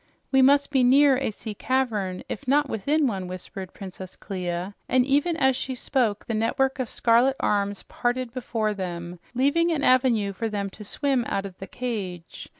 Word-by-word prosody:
"We 265 -1 +5
must 280 +2 +4
be 265 -3 +3
near 270 +2 +6
a 270 - -1
sea 215 0 -7
cavern, 210 -6 -1
if 285 - -6
not 290 +2 +3
within 285 +7 +1
one," 195 -7 -2
whispered 185 +1 -7
Princess 185 -1 -9
Clia, 180 0 -4 0.2
and 255 -1 +4
even 290 +5 +2
as 265 -4 +3
she 260 +1 -3
spoke 235 -5 0
the 230 - -3
network 265 +5 0
of 250 -3 -2
scarlet 240 +3 +3
arms 200 -1 0
parted 245 -1 -2
before 225 -4 -1
them, 175 -2 -5 0.2
leaving 285 +7 +3
an 300 -3 -1
avenue 245 -6 +3
for 225 +4 -3
them 200 -2 -3
to 210 - -10
swim 265 +4 0
out 195 - -1
of 190 -2 -8
the 195 - -7
cage. 195 -9 -5
235 Hz, 180 wpm, -25 LUFS, 195-265 Hz, 0.2 s, near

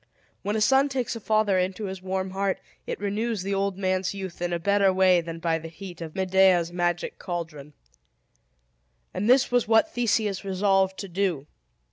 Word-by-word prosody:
When 205 +2 -2
a 220 - 0
son 270 +5 +4
takes 255 -3 -2
a - - -5
father 215 -3 +2
into 185 +3 -2
his 190 -1 -6
warm 190 0 -3
heart 195 0 -1 0.3
it - - -4
renews 205 +1 -2
the 200 +1 -2
old 195 -1 -1
man's 185 0 -1
youth 190 -3 -7
in 175 0 -1
a 170 - 0
better 200 +2 +3
way 185 -1 +4
than 165 0 -7
by 165 0 0
the 165 - -8
heat 175 +1 -10
of 160 -2 -7
Medea's 185 -2 +3
magic 175 -1 -1
caldron. 160 -5 -6 1.4
And 200 +5 -1
this 255 0 +4
was 245 -2 +2
what 225 +9 +3
Theseus 215 -4 0
resolved 195 0 +1
to 200 - -6
do. 180 -6 -1
190 Hz, 180 wpm, -26 LUFS, 175-205 Hz, 1.4 s, son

